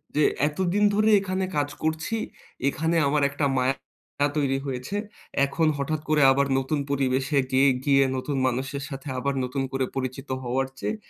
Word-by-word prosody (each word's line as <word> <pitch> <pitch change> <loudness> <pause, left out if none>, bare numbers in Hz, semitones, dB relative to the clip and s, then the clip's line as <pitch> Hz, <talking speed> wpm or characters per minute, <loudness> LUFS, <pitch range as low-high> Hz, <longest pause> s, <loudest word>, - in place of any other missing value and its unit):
যে 150 - +3 0.2
এতদিন 185 +6 0
ধরে 215 +1 +3
এখানে 190 -1 -2
কাজ 145 0 +1
করছি 160 +7 -1 0.5
এখানে 160 +4 -1
আমার 145 0 +2
একটা 140 +1 -1
মায়া 130 +1 +2 0.6
তৈরি 135 -2 +1
হয়েছে। 130 +7 -4 0.5
এখন 155 +3 0
হঠাৎ 150 +2 -2
করে 155 -1 +3
আবার 140 +1 +2
নতুন 140 +3 -1
পরিবেশে 135 +1 +1
গিয়ে 135 +1 +5 0.2
গিয়ে 140 -1 +5
নতুন 135 +1 -2
মানুষের 135 +2 -2
সাথে 135 +1 -7
আবার 140 +2 -1
নতুন 130 +2 -2
করে 135 -1 0
পরিচিত 130 +1 -4
হওয়ার 130 +2 0
চেয়ে 220 - -2
140 Hz, 155 wpm, -25 LUFS, 135-155 Hz, 0.6 s, গিয়ে